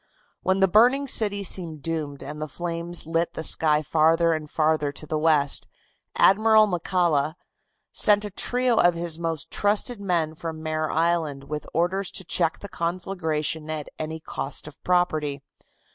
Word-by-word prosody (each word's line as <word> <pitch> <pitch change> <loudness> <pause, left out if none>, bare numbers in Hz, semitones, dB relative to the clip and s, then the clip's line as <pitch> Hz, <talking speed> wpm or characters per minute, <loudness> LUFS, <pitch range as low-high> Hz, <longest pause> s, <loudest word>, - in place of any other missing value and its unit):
When 190 +1 +1
the 195 - +6
burning 245 +8 +4
city 205 -5 -1
seemed 165 -6 -2
doomed 150 -4 -4
and 150 +3 -7
the 155 - -3
flames 170 +1 -3
lit 165 +1 -1
the 160 - -4
sky 155 -1 +2
farther 165 +2 +3
and 155 -1 -4
farther 155 -2 +1
to 150 - -6
the 155 0 -2
west, 150 -3 +2 0.5
Admiral 215 +2 +5
McCalla 175 -5 0 0.6
sent 210 0 +4
a 205 - -6
trio 245 +4 +1
of 175 -1 +4
his 170 -1 -1
most 165 -3 -3
trusted 205 +2 0
men 170 -5 0
from 160 0 -7
Mare 155 0 -1
Island 160 -4 0
with 150 +2 -6
orders 180 +3 0
to 190 - -1
check 165 -1 +1
the 200 - -7
conflagration 165 -4 -3
at 155 -2 -4
any 160 +1 -4
cost 145 -2 -4
of 150 - -13
property. 155 -6 0
165 Hz, 160 wpm, -25 LUFS, 155-185 Hz, 0.6 s, the